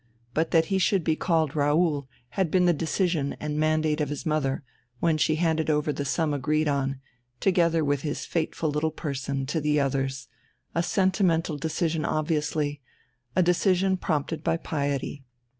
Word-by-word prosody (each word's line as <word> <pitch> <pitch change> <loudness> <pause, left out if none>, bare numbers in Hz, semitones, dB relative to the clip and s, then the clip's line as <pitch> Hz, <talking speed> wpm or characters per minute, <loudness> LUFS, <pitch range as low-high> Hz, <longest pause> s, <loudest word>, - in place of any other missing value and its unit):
But 160 +1 +1
that 165 -1 +4
he 190 - +3
should 190 -1 +2
be 160 0 +2
called 160 -4 +1
Raoul 145 -1 +2 0.2
had 185 +5 0
been 180 +2 +3
the 175 - +5
decision 160 -1 0
and 150 0 -3
mandate 155 0 +1
of 145 - -1
his 145 - -5
mother, 150 -4 0 0.4
when 165 -2 +2
she 155 +2 +3
handed 160 -1 +1
over 150 0 +1
the 145 - -3
sum 150 +2 0
agreed 155 +3 +1
on, 135 -2 0 0.4
together 170 -3 +2
with 145 -1 +1
his 150 0 -3
fateful 160 -1 -1
little 150 +2 0
person, 140 -3 -3
to 155 +4 -1
the 150 0 +2
others 135 -2 -1 0.5
a 170 - +1
sentimental 180 -3 +1
decision 160 +1 -1
obviously, 150 -2 -1 0.5
a 185 - +4
decision 185 +2 +3
prompted 155 -3 -2
by 165 - +1
piety. 140 -3 -3
155 Hz, 160 wpm, -26 LUFS, 145-165 Hz, 0.5 s, the